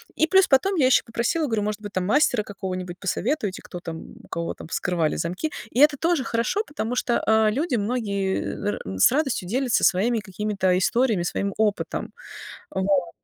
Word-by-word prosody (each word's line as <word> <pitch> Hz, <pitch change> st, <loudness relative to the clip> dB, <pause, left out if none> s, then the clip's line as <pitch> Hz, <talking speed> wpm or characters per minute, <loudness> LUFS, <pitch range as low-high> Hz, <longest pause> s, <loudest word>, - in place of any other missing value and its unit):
И 315 Hz, -, +2 dB
плюс 385 Hz, +1 st, +5 dB
потом 340 Hz, +9 st, +3 dB
я 290 Hz, -7 st, +3 dB
еще 255 Hz, -, +5 dB
попросила, 240 Hz, +8 st, -1 dB
говорю, 220 Hz, -4 st, 0 dB
может 210 Hz, 0 st, -3 dB
быть, 205 Hz, -1 st, -8 dB
там, 185 Hz, -1 st, -1 dB
мастера 250 Hz, -2 st, +3 dB
какого-нибудь 185 Hz, -3 st, -6 dB
посоветуете, 205 Hz, -, -2 dB
кто 175 Hz, -, -8 dB
там, 165 Hz, -2 st, -8 dB
у -, -, -16 dB
кого, 170 Hz, 0 st, -3 dB
там, -, -, -11 dB
вскрывали 165 Hz, -2 st, -1 dB
замки. 180 Hz, -, -3 dB, 0.2 s
И 245 Hz, -, -1 dB
это 295 Hz, 0 st, +6 dB
тоже 330 Hz, -2 st, +1 dB
хорошо, 235 Hz, -, 0 dB
потому 250 Hz, -, -4 dB
что, 240 Hz, -1 st, 0 dB
э, 220 Hz, -1 st, +4 dB
люди 280 Hz, +6 st, -1 dB
многие, 205 Hz, -2 st, -1 dB
э, 95 Hz, +1 st, -7 dB
с -, -, +6 dB
радостью 270 Hz, -, 0 dB
делятся 255 Hz, 0 st, +1 dB
своими 220 Hz, +5 st, +3 dB
какими-то 195 Hz, -2 st, -1 dB
историями, 220 Hz, -1 st, +2 dB
своим 200 Hz, +2 st, -2 dB
опытом. 210 Hz, -2 st, -1 dB, 0.6 s
Вот. 190 Hz, -3 st, 0 dB
215 Hz, 175 wpm, -24 LUFS, 190-260 Hz, 0.6 s, это